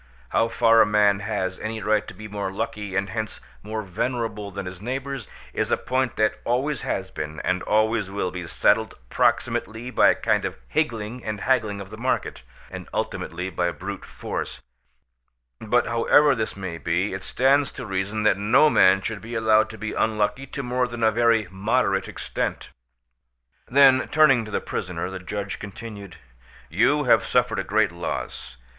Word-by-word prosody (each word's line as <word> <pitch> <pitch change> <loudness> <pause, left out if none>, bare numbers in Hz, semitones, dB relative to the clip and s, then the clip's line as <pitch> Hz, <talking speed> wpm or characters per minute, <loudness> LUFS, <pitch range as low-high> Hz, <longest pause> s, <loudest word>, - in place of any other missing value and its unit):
How 115 - +2
far 115 -1 +5
a - - +6
man 105 -1 +3
has 100 -3 -3
any 110 +1 -4
right 105 0 +1
to - - -9
be 110 +3 -8
more 100 -2 -4
lucky 105 -1 -4
and 95 0 -1
hence 110 +1 -4 0.2
more 110 +1 -4
venerable 105 +1 -3
than 100 0 -6
his 90 0 -8
neighbours, 130 0 -4 0.3
is - - -1
a - - +2
point 130 -1 -1
that 110 0 +1
always 130 +2 0
has 95 -1 -3
been, 75 0 -5
and 90 0 0
always 110 -1 +1
will 95 -2 -2
be, 90 -2 -6
settled 110 +5 +2
proximately 115 +4 0
by - - +5
a - - +4
kind - - +1
of - - -4
higgling 120 -6 -2
and 105 -2 -4
haggling 110 -6 +1
of 100 0 -9
the 110 - -8
market, 130 +2 -1 0.3
and - - -8
ultimately 90 +3 -3
by 90 0 0
brute 75 -4 -6
force; - - -5 1.0
but 120 +3 +1
however 140 +5 +4
this 110 -4 -3
may 90 -4 -5
be, 90 +5 0
it 95 - -4
stands 135 +5 +2
to - - -7
reason 100 +2 -2
that 100 -2 +3
no 130 +9 +5
man 95 +1 +5
should 110 -2 -4
be 115 +2 -7
allowed 110 -1 +3
to 110 - -9
be 110 -1 -4
unlucky 110 +5 0
to 140 +1 -5
more 125 0 0
than 120 -1 -5
a 110 - +5
very 115 -2 +3
moderate 95 +4 +1
extent." - - -4 1.0
Then, 135 0 +5
turning 135 -7 +4
to - - -9
the - - -1
prisoner, 90 -1 -4
the 95 - -5
judge 100 +2 -5
continued:—"You 100 - -3
have 125 - +4
suffered - - +1
a - - -1
great 105 -2 +2
loss. 85 -6 -5
110 Hz, 175 wpm, -24 LUFS, 95-120 Hz, 1.0 s, a